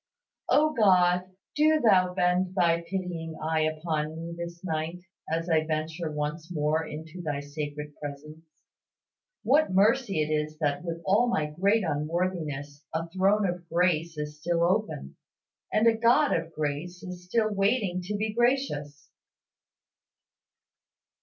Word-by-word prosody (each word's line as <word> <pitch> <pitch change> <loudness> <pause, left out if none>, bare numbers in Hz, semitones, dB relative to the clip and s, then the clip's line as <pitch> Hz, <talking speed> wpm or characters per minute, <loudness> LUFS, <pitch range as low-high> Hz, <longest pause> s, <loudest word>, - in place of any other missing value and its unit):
O 310 +1 +4
God! 185 -5 +4 0.3
do 310 +1 +4
Thou 185 -7 +4
bend 180 +1 +1
Thy 170 -2 +3
pitying 170 -2 -4
eye 160 0 0
upon 155 0 -1
me 165 +1 -6
this 170 0 -7
night, 160 0 -2 0.3
as 165 +1 -1
I 160 -2 +3
venture 155 +1 -3
once 150 +3 -4
more 155 0 +1
into 160 +3 -8
Thy 150 -4 -2
sacred 145 +1 -6
presence. 150 +2 -8 1.0
What 300 0 +3
mercy 200 -2 +3
it 150 - -4
is 155 0 -2
that, 145 0 -1
with 170 -1 -5
all 205 +6 +4
my 155 -11 +1
great 200 +7 +2
unworthiness, 150 -2 -2
a 165 +1 -2
throne 195 +3 +2
of 175 -1 -5
grace 170 -2 +1
is 150 0 -5
still 170 +2 0
open, 180 - -1 0.5
and 215 - +3
a 230 - +6
God 240 +6 +4
of 165 0 -3
grace 155 +4 -4
is 180 -1 -8
still 215 +3 +1
waiting 195 -2 +1
to 210 - -2
be 215 +1 -1
gracious! 235 - 0
170 Hz, 140 wpm, -28 LUFS, 155-190 Hz, 1.0 s, a